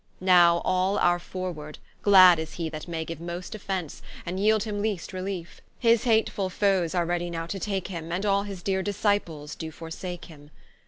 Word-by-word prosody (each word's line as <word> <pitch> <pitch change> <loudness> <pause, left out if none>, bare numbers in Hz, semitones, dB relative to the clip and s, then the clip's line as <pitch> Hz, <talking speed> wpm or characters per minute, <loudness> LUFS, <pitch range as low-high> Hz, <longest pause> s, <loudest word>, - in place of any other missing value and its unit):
Now 175 -2 +5
all 185 +2 +1
are 175 -2 +3
forward, 175 -5 -6 0.2
glad 185 -4 +8
is 160 0 -5
he 165 -2 -3
that 155 +1 -7
may 165 -2 -3
Give 165 0 -7
most 175 +1 -6
offence, 190 -6 -4 0.2
and 180 +2 -3
yeeld 215 +1 +3
him 210 -2 -3
least 205 -5 -2
reliefe: 185 -2 -5 0.2
His 230 -1 +3
hatefull 220 -4 +1
foes 190 -3 +1
are 175 -1 +2
ready 175 0 -1
now 165 -1 -4
to 195 +4 -5
take 195 -1 -3
him, 165 -3 -6
And 185 +4 -2
all 200 -1 +3
his 200 -3 -7
deere 190 -1 0
Disciples 200 -7 -1
do 160 - -6
forsake 165 +3 -7
him. 145 -3 -15
180 Hz, 190 wpm, -26 LUFS, 170-200 Hz, 0.2 s, glad